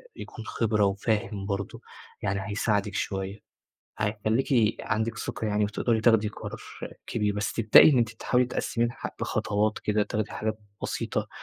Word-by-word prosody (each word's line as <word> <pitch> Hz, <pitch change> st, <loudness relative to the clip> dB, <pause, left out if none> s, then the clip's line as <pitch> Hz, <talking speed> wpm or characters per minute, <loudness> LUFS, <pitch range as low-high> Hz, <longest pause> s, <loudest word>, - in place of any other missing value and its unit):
يكون 110 Hz, -, -8 dB
خِبرة 105 Hz, -3 st, +1 dB
وفاهم 105 Hz, +1 st, -1 dB
برضه، 100 Hz, -1 st, -4 dB, 0.4 s
يعني 100 Hz, -1 st, 0 dB
هيساعدِك 105 Hz, -1 st, 0 dB
شوية، 95 Hz, 0 st, -3 dB, 0.6 s
هيخلّيكِ 110 Hz, +2 st, +1 dB
عندِك 115 Hz, +1 st, -1 dB
ثقة 110 Hz, -, -3 dB
يعني 105 Hz, 0 st, +2 dB
وتقدري 110 Hz, +2 st, 0 dB
تاخدي 110 Hz, -2 st, +4 dB
قرار -, -, -7 dB, 0.5 s
كبير، 105 Hz, -2 st, 0 dB
بس 105 Hz, -1 st, -1 dB
تبدئي 115 Hz, +6 st, +7 dB
إن 130 Hz, -, +4 dB
أنتِ 115 Hz, -2 st, +3 dB
تحاولي 125 Hz, +2 st, +1 dB
تقسّميه 120 Hz, -1 st, 0 dB
لح 120 Hz, -, -5 dB
لخطوات 105 Hz, +1 st, 0 dB
كده، 105 Hz, 0 st, +1 dB
تاخدي 105 Hz, +1 st, -2 dB
حاجات 110 Hz, 0 st, -2 dB, 0.2 s
بسيطة، -, -, -2 dB
105 Hz, 140 wpm, -27 LUFS, 105-115 Hz, 0.6 s, تبدئي